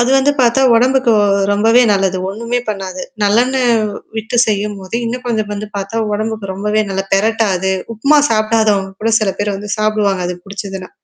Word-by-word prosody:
அது 240 Hz, +2 st, +2 dB
வந்து 280 Hz, +2 st, +3 dB
பார்த்தா 245 Hz, +2 st, +3 dB
உடம்புக்கு 255 Hz, 0 st, +3 dB, 0.4 s
ரொம்பவே 225 Hz, +4 st, +4 dB
நல்லது. 195 Hz, -1 st, +1 dB
ஒண்ணுமே 235 Hz, +4 st, -2 dB
பண்ணாது. 190 Hz, -3 st, -4 dB, 0.2 s
நல்லென்ன 240 Hz, +6 st, +2 dB, 0.6 s
விட்டு 220 Hz, +2 st, -3 dB
செய்யும்போது, 205 Hz, -1 st, -3 dB
இன்னும் 250 Hz, +2 st, -4 dB
குழந்தை 225 Hz, -3 st, -1 dB
வந்து 210 Hz, +1 st, -6 dB
பார்த்தா 200 Hz, +3 st, -2 dB
உடம்புக்கு 215 Hz, -2 st, -3 dB
ரொம்பவே 210 Hz, +2 st, 0 dB
நல்ல 195 Hz, 0 st, -2 dB
பிரட்டாது 195 Hz, -3 st, +1 dB, 0.2 s
உப்புமா 280 Hz, +8 st, +3 dB
சாப்பிடாதவங்க 215 Hz, -3 st, +1 dB
கூட 225 Hz, 0 st, +1 dB
சில 200 Hz, -2 st, 0 dB
பேர் 205 Hz, -1 st, -1 dB
வந்து 205 Hz, +1 st, -7 dB
சாப்பிடுவாங்க 210 Hz, -4 st, 0 dB
அது 180 Hz, -, -4 dB
புடிச்சதுனா. 195 Hz, -1 st, -7 dB
215 Hz, 150 wpm, -16 LUFS, 195-230 Hz, 0.6 s, ரொம்பவே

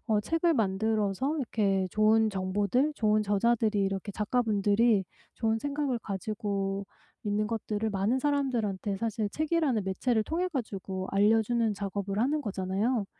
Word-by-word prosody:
어 215 Hz, -3 st, +2 dB
책을 330 Hz, +9 st, +1 dB
만들어서 220 Hz, +4 st, 0 dB
이렇게 200 Hz, -7 st, 0 dB
좋은 220 Hz, +2 st, +4 dB
정보들 205 Hz, +8 st, 0 dB
좋은 215 Hz, -4 st, +2 dB
저자들이 215 Hz, +1 st, +1 dB
이렇게 195 Hz, +1 st, -2 dB
작가분들이 210 Hz, -1 st, +2 dB, 0.3 s
좋은 225 Hz, -1 st, 0 dB
생각을 280 Hz, -1 st, -1 dB
가지고 200 Hz, -1 st, -3 dB, 0.4 s
있는 210 Hz, 0 st, 0 dB
것들을 220 Hz, -1 st, -2 dB
많은 205 Hz, +5 st, 0 dB
사람들한테 240 Hz, -9 st, -1 dB
사실 220 Hz, -1 st, -1 dB
책이라는 305 Hz, -, 0 dB
매체를 220 Hz, +4 st, 0 dB
통해 350 Hz, +7 st, -1 dB
가지고 195 Hz, -, -4 dB
알려주는 220 Hz, +3 st, +3 dB
작업을 200 Hz, 0 st, -3 dB
하는 280 Hz, +7 st, +1 dB
거잖아요. 200 Hz, +2 st, -1 dB
215 Hz, 345 characters per minute, -29 LUFS, 200-240 Hz, 0.4 s, 좋은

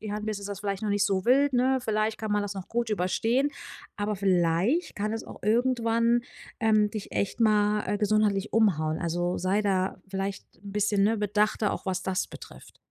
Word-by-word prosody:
Jahren 210 Hz, 0 st, -4 dB
bist, 215 Hz, -2 st, -3 dB
ist 200 Hz, -, -6 dB
das 200 Hz, -1 st, -6 dB
vielleicht 200 Hz, -1 st, -3 dB
noch 215 Hz, -, -1 dB
nicht 205 Hz, 0 st, +2 dB
so 190 Hz, -2 st, 0 dB
wild, 275 Hz, +3 st, +4 dB
ne, 260 Hz, +2 st, +3 dB
vielleicht 215 Hz, -1 st, 0 dB
kann 215 Hz, -1 st, -3 dB
man 205 Hz, 0 st, +1 dB
das 205 Hz, 0 st, -4 dB
noch 190 Hz, -2 st, -7 dB
gut 235 Hz, 0 st, -1 dB
überstehen, 225 Hz, +8 st, +1 dB, 0.5 s
aber 205 Hz, 0 st, -2 dB
vielleicht 190 Hz, -, +1 dB
kann 210 Hz, +1 st, -2 dB
es 225 Hz, -, -5 dB
auch -, -, -12 dB
irgendwann, 230 Hz, +1 st, +2 dB, 0.4 s
ähm, 215 Hz, -2 st, +3 dB
dich 210 Hz, -1 st, -7 dB
echt 200 Hz, -, -2 dB
mal, 210 Hz, -1 st, +3 dB
äh, 205 Hz, -, -1 dB
gesundheitlich 210 Hz, -1 st, +1 dB
umhauen. 160 Hz, -8 st, +2 dB
Also 175 Hz, +1 st, -1 dB
sei 185 Hz, +3 st, +1 dB
da 190 Hz, -2 st, 0 dB
vielleicht 195 Hz, 0 st, -4 dB
'n 200 Hz, +2 st, -10 dB
bisschen, 205 Hz, 0 st, +1 dB
ne, 225 Hz, +2 st, +2 dB
bedachter 210 Hz, +1 st, +1 dB
auch, -, -, -6 dB
was 185 Hz, -1 st, -1 dB
das 185 Hz, -1 st, -1 dB
betrifft. -, -, -13 dB
210 Hz, 195 wpm, -27 LUFS, 195-220 Hz, 0.5 s, wild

